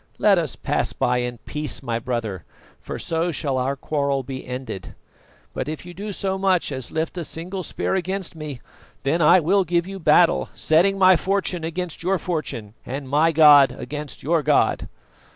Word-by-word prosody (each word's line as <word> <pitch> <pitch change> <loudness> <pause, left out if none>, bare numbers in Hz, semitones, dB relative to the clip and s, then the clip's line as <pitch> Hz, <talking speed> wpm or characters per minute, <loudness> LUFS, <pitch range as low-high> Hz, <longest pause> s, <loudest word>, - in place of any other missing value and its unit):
Let 200 -3 +4
us 155 -6 -2
pass - - -1
by 125 0 +1
in 120 0 -3
peace, 150 -6 -3
my 115 -2 -2
brother, 110 -7 -3 0.4
for - - -6
so 165 +1 -1
shall 140 -4 -1
our 135 +2 -1
quarrel 140 -1 -1
be 130 0 -7
ended; 125 -7 -6 0.6
but 145 - -3
if 155 +1 -6
you 175 - -9
do 205 +4 -6
so 190 0 -2
much 190 -5 +1
as 130 -3 -3
lift 160 +3 -2
a - - -3
single 180 +5 -4
spear - - -3
against 190 -1 -2
me, 150 -5 -7 0.4
then 160 +5 +1
I 170 +4 +7
will 190 +4 +2
give 170 0 0
you 195 +1 -7
battle, 165 +1 +4
setting 180 +5 +3
my 185 -1 +6
fortune 185 0 -1
against 170 +1 -4
your 190 +3 +1
fortune 140 - -4
and 135 +1 -6
my 150 +4 +3
god 150 -3 +7
against 150 -1 -7
your 165 +3 +2
God! - - +1
160 Hz, 180 wpm, -22 LUFS, 135-180 Hz, 0.6 s, I